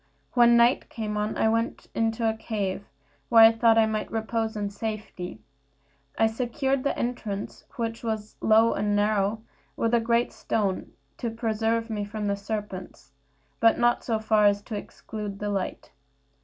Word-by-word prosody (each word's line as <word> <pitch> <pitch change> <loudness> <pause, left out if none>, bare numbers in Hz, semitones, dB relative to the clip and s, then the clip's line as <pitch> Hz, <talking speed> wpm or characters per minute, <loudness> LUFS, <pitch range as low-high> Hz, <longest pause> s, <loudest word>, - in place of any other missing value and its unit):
When 235 -1 +6
night 235 +2 +3
came 215 -2 -4
on 210 +1 -2
I - - +3
went 230 +1 -1
into 225 0 0
a 220 - +2
cave, 205 -3 -3 0.4
where 230 -1 +8
I 225 - +8
thought 225 0 +4
I 225 - +6
might 215 -1 -2
repose 225 0 -2
in 205 -1 -3
safety. 205 - -6 0.8
I 225 - +4
secured 255 +4 -1
the 280 - -1
entrance, 220 -5 -4
which 230 -1 -3
was 220 -2 -3
low 225 +1 +5
and 205 0 0
narrow, 205 +1 +1 0.3
with 230 0 0
a 235 - +5
great 235 +1 +1
stone, 200 -4 -2 0.3
to 235 - -2
preserve 225 0 -1
me 210 -1 -2
from 210 +1 -5
the 200 0 +1
serpents, 200 -8 -6 0.5
but 225 0 +5
not 240 0 +2
so 225 -2 0
far 215 -1 +3
as 205 0 +1
to 215 - -6
exclude 205 0 -7
the 205 +1 -3
light. 195 -2 -3
220 Hz, 165 wpm, -26 LUFS, 210-230 Hz, 0.8 s, where